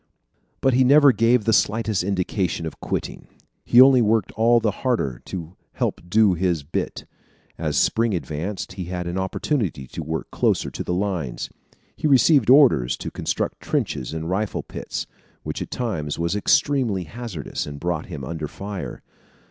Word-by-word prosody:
But 135 - +3
he 130 +2 +4
never 140 +2 +7
gave 115 +1 +3
the 115 - +3
slightest 110 -2 +1
indication 90 -3 -1
of 80 - -7
quitting. - - -4 0.4
He 120 - +4
only 130 -1 +8
worked 110 -2 +2
all 115 +2 +4
the 110 -2 +1
harder 70 - -1
to 85 -1 -7 0.2
help - - -2
do 105 0 +4
his 85 -3 0
bit. 75 - -4 0.5
As 75 -3 -1
Spring 115 -3 +2
advanced, 85 +5 -4
he 95 -2 -5
had 90 0 -4
an 85 +2 -2
opportunity 95 - -2
to 75 - -7
work 80 +1 -4
closer - - +1
to - - -5
the 90 - -2
lines. 90 -10 -3 0.4
He - - -1
received 135 -2 +5
orders 125 - +5
to - - -6
construct - - -3
trenches 65 - -2
and 80 0 -4
rifle 100 +4 -2
pits, - - -5 0.4
which - - -5
at - - -5
times 85 -12 -3
was 85 +3 -1
extremely 110 -2 +2
hazardous 100 - -6
and 70 -1 -7
brought 85 -1 -2
him 75 -7 -7
under 80 +3 -4
fire. 100 +4 -7
95 Hz, 165 wpm, -23 LUFS, 80-115 Hz, 0.5 s, only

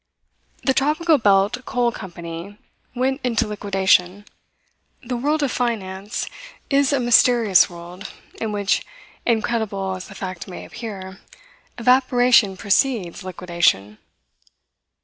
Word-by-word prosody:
The 265 - +2
Tropical 305 +3 +2
Belt 205 +3 +2
Coal 245 -2 0
Company 175 0 -8 0.4
went 265 +3 0
into 235 -4 +1
liquidation. 195 -2 +1 0.8
The 250 +1 -3
world 295 +5 0
of 275 - 0
finance 205 -4 -3 0.5
is 275 0 +3
a 280 - +2
mysterious 235 -5 +5
world 175 +3 -10 0.3
in 220 - -2
which, 205 -1 0 0.4
incredible 220 -4 -1
as 185 - -8
the 195 - -12
fact 185 -2 -6
may 180 - -8
appear, 195 -5 -8 0.6
evaporation 245 -4 +4
precedes 200 -3 0
liquidation. 170 - 0
210 Hz, 110 wpm, -21 LUFS, 190-245 Hz, 0.8 s, mysterious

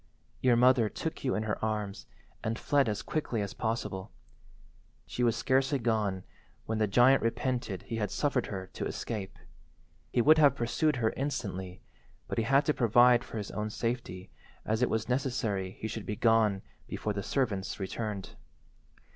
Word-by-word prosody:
Your 125 -2 +4
mother 125 -2 +5
took 160 - -5
you 130 - +1
in 110 - -1
her 110 -1 -3
arms 105 -2 -3 0.4
and 110 0 -1
fled 140 -5 +2
as 105 - -3
quickly 145 -7 -2
as 100 - -5
possible. 110 -4 -3 0.9
She - - -5
was 120 -2 +3
scarcely 135 +3 +2
gone 110 -6 0 0.4
when 110 0 -2
the 110 - +3
giant 125 +6 +5
repented 120 -3 -2
he 115 - -4
had 105 -3 -1
suffered 140 0 0
her 95 -2 -5
to - - -4
escape. 105 -4 -5 0.7
He - - +1
would 155 +3 +6
have 145 -3 +6
pursued 140 +5 +1
her 115 -3 +1
instantly, 95 -10 -4 0.4
but - - -2
he - - +2
had 135 +4 +4
to 150 - +2
provide 120 0 +5
for 115 - -7
his 105 -2 -5
own 105 0 -3
safety, 110 -5 -4 0.3
as 110 +2 0
it 125 - +3
was 110 0 -1
necessary 120 -7 -1
he 110 - -3
should 110 -1 -6
be 105 - -2
gone 110 -3 +3 0.2
before 105 - -3
the 100 - -3
servants 105 -7 -1
returned. 100 0 -4
115 Hz, 170 wpm, -30 LUFS, 105-125 Hz, 0.9 s, would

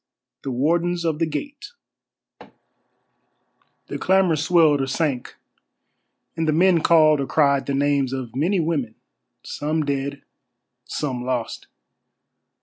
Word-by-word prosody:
THE - - -5
WARDENS 170 +7 0
OF 160 -2 -1
THE 165 - +1
GATE 280 - -7 2.1
The - - -6
clamour 190 -3 +3
swelled 155 -2 +3
or 135 - -2
sank, 135 -2 -2 1.0
and 160 -1 -2
the - - +3
men 170 +1 +3
called 155 -3 +4
or 135 - -3
cried 140 -3 +2
the 140 - -1
names 140 -2 +1
of 130 -3 -6
many 175 +8 +1
women, 145 -9 -2 0.5
some 155 +1 -2
dead, 140 0 -3 0.6
some 130 -5 -4
lost. 125 -2 -4
150 Hz, 120 wpm, -22 LUFS, 135-165 Hz, 2.1 s, called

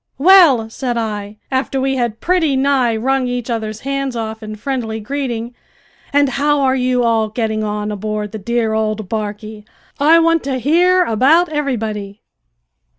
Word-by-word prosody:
"Well," 300 -7 +6
said 240 +1 -4
I, 210 -2 -4
after 265 +1 -1
we 270 0 0
had 235 -3 -2
pretty 335 -6 +1
nigh 265 -3 +2
wrung 265 +2 0
each 245 -1 -3
other's 220 -2 -4
hands 275 -1 -3
off 220 -1 -5
in 215 0 -7
friendly 225 -1 -3
greeting, 240 -1 -4 0.6
"and 285 0 +3
how 285 +2 +1
are 260 -1 +2
you 250 -1 +1
all 225 -2 +1
getting 220 -1 -2
on 210 0 -3
aboard 210 0 -4
the 220 - -6
dear 230 +1 -1
old 215 -1 -2
barquey? 215 0 -5 0.4
I 310 +4 +5
want 330 -1 +3
to 270 -2 -1
hear 350 +8 +3
about 295 +9 +3
everybody." 220 -9 -3
240 Hz, 155 wpm, -17 LUFS, 220-275 Hz, 0.6 s, Well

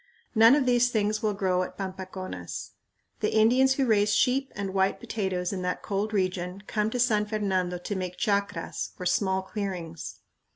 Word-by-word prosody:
None 225 +2 +7
of 290 -3 +2
these 245 -1 +4
things 215 -1 0
will 215 -3 0
grow 185 -2 +1
at 180 - -5
Pampaconas. 185 -1 -6 0.5
The - - 0
Indians 250 +5 +5
who 270 - +1
raise 210 -3 +3
sheep 270 +2 +2
and 195 -1 -3
white 190 0 +1
potatoes 190 -3 -2
in 185 - -3
that 180 0 -2
cold 205 +2 -1
region 185 -1 -2
come 210 +1 0
to 245 - -3
San 215 -4 +2
Fernando 190 -4 -1
to 190 +3 -4
make 180 -1 -4
chacras 200 -2 -1
or 180 - -6
small 190 +1 +1
clearings. 185 -6 -5
200 Hz, 170 wpm, -27 LUFS, 185-220 Hz, 0.5 s, None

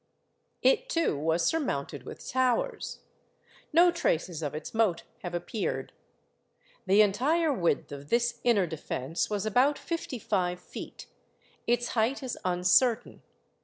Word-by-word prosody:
It - - +3
too 330 - +1
was 160 +3 +1
surmounted 145 - -1
with - - -9
towers. 255 -2 0 0.7
No 345 +2 +6
traces 175 - -1
of 150 -1 -3
its 155 - -6
moat 215 -7 +2 0.2
have 175 -1 -5
appeared. 200 +4 -3 0.9
The 200 +3 +6
entire 290 +10 +2
width 170 - 0
of 145 0 -8
this 235 0 +1
inner 220 -6 +4
defence 160 -1 -3
was 205 -1 -2
about 255 +7 +3
fifty 335 -5 -4
five 180 -4 -1
feet; - - -9 0.6
its 240 +1 +1
height 240 +5 0
is 255 - -3
uncertain. 185 +7 +2
220 Hz, 130 wpm, -29 LUFS, 175-260 Hz, 0.9 s, No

